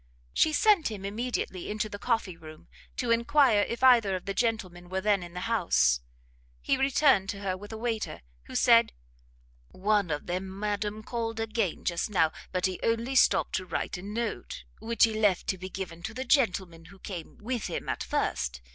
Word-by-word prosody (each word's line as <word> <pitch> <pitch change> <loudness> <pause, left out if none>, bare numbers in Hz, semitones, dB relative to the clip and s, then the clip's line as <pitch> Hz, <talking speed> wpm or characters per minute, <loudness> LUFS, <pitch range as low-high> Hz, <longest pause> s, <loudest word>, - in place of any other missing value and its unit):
She 315 - +3
sent 390 - +4
him 200 -3 -6
immediately 210 -3 -3
into 210 +1 -1
the 205 -1 -8
coffee 225 -7 -1
room, 155 -1 -13 0.3
to 245 -2 0
enquire 235 -1 +4
if 235 +4 -3
either 235 -7 +6
of 185 - -6
the 200 - -2
gentlemen 190 -6 -2
were 190 +1 -1
then 205 -1 +2
in 175 0 -10
the 180 - -4
house. 175 - +2 0.6
He - - +1
returned 270 -6 +3
to 200 - -3
her 190 -2 -1
with 205 +3 -10
a 220 - -5
waiter, 225 -1 -3 0.2
who - - -10
said, - - +5 0.8
"One 205 -1 +1
of 150 -1 -3
them, 190 +2 -4
madam, 210 +1 -2
called 225 -1 -3
again 225 -5 -2
just 170 +4 -1
now, 165 -6 +3 0.2
but 185 -1 0
he 185 -1 -2
only 230 +3 0
stopt 260 - +4
to 185 - -5
write - - -3
a 180 - -6
note, 210 - -4 0.2
which 230 0 +1
he 225 - +5
left 210 -4 +2
to 190 - -1
be 185 +1 -6
given 180 -3 -6
to 220 +6 -6
the 260 +1 -4
gentleman 185 - +1
who 195 +4 -15
came 185 -3 -8
with 240 +1 -3
him - - -5
at - - -2
first. 60 0 -1
205 Hz, 190 wpm, -28 LUFS, 185-230 Hz, 0.8 s, either